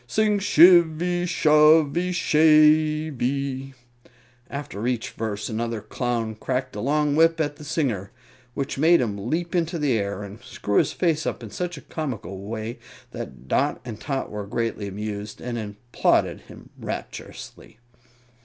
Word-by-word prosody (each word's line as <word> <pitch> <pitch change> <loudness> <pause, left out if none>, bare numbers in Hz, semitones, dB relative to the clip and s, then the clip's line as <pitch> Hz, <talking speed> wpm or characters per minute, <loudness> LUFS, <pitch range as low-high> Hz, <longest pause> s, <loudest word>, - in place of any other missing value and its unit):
Sing 210 - +2
shivvy, 175 -1 +5
shovvy, 155 +1 +4
shavey! 150 -5 +2 0.8
After 125 -6 -5
each 125 -3 -2
verse 105 -2 -4
another 115 0 -3
Clown 115 0 -2
cracked 130 +3 -3
a - - -4
long 145 +2 +1
whip 165 +1 +4
at 145 -2 -1
the 150 - -11
singer, 130 - -1 0.5
which 135 -1 -3
made 170 +3 +5
him 105 -2 -2
leap 170 +3 -2
into 170 -1 0
the 145 -6 +1
air 100 -1 -2
and 100 +3 -10
screw 115 -5 0
his - - +1
face 160 -4 0
up - - -4
in 110 - -8
such 175 -2 -4
a - - -9
comical 115 - -5
way 110 +1 -5 0.3
that 65 - -8
Dot - - +1
and 115 -3 -7
Tot 135 +6 -3
were 105 -1 -5
greatly 115 -1 -2
amused, 105 +1 -6
and 120 -1 -4
applauded 110 +3 0
him - - -14
rapturously. - - -8
135 Hz, 145 wpm, -24 LUFS, 110-155 Hz, 0.8 s, shivvy